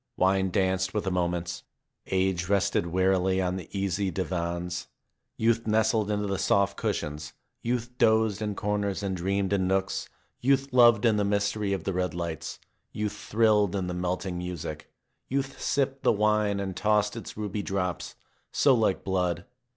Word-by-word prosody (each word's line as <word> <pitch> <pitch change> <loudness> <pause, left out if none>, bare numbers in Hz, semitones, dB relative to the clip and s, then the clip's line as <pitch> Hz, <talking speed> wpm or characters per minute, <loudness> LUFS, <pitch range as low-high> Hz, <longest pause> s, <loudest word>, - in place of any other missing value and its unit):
Wine 95 0 +3
danced 95 0 0
with 105 - 0
the 95 - -1
moments. 85 -1 -1 0.5
Age 95 -2 0
rested 100 -3 +2
wearily 95 +1 +2
on 90 -1 0
the 90 - -8
easy 100 0 -1
divans. 90 -1 -3 0.5
Youth 115 0 +1
nestled 110 0 +2
into 105 0 0
the 100 -1 -2
soft 100 -1 +2
cushions; 75 +1 -3 0.3
youth 120 0 -2
dozed 110 -3 +3
in 105 -1 -2
corners 100 -1 -1
and 95 -1 -1
dreamed 95 +2 0
in 95 -2 +1
nooks; 95 0 -1 0.3
youth 135 +1 +2
loved 120 -3 +6
in 110 -2 +4
the 105 - +2
mystery 100 0 0
of 95 -4 -1
the 95 - -2
red 90 -2 -1
lights; 80 -2 -4 0.3
youth 105 -1 -2
thrilled 105 -3 +2
to 100 - -1
the 90 0 -3
melting 90 0 -2
music; 85 -4 -6 0.4
youth 135 +1 -2
sipped 135 -1 0
the - - +4
wine 105 -1 +2
and 95 -2 -3
tossed 105 0 +2
its 115 - -8
ruby 105 -1 -3
drops, 90 -3 -3 0.4
so 140 - +4
like 110 -6 +1
blood. 90 -3 -1
100 Hz, 160 wpm, -27 LUFS, 90-105 Hz, 0.5 s, loved